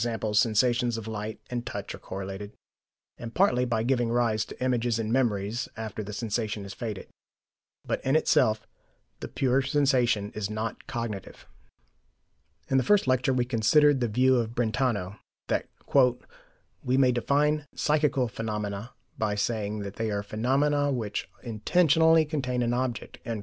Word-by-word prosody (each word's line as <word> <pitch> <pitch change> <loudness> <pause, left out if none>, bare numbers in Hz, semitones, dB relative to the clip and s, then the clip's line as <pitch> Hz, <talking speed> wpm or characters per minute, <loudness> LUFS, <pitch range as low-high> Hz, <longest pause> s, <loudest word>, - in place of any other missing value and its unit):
sensations 120 +2 +2
of 110 - -6
sight 110 0 -5
and 120 -1 -3
touch - - -5
are - - -9
correlated, 95 +2 -6 0.7
and 115 -1 -8
partly 125 -10 +3
by 115 -2 0
giving 120 -1 +1
rise 115 -3 +1
to - - -8
images 120 -2 +1
and 110 0 -1
memories 115 -2 0
after 110 -1 -5
the 105 +1 -7
sensation 110 -2 -2
is 100 - -7
faded. 110 -5 -6 0.8
But - - -2
in 135 +3 +1
itself 110 -8 +2 0.5
the - - -5
pure 135 0 +1
sensation 125 -6 +2
is 105 -1 -3
not 110 +1 -4
cognitive. 115 -5 -5 1.2
In 135 - +3
the 130 - +3
first 205 -8 +4
lecture 130 0 +2
we 125 -1 +1
considered 145 +5 +4
the 120 - +1
view 130 0 +5
of 115 -1 -2
Brentano, 110 -4 -1 0.3
that - - -1 1.2
"we 130 +1 +1
may 130 -2 +5
define 145 +5 +1
psychical 150 -4 +1
phenomena 105 -1 -4 0.3
by 105 -2 0
saying 105 0 -1
that 100 0 -7
they 115 -1 -1
are 100 -1 -2
phenomena 140 +7 +1
which 110 -6 -3
intentionally 160 +7 +3
contain 130 -5 -1
an 120 0 0
object." 125 -1 -3
120 Hz, 145 wpm, -27 LUFS, 110-130 Hz, 1.2 s, view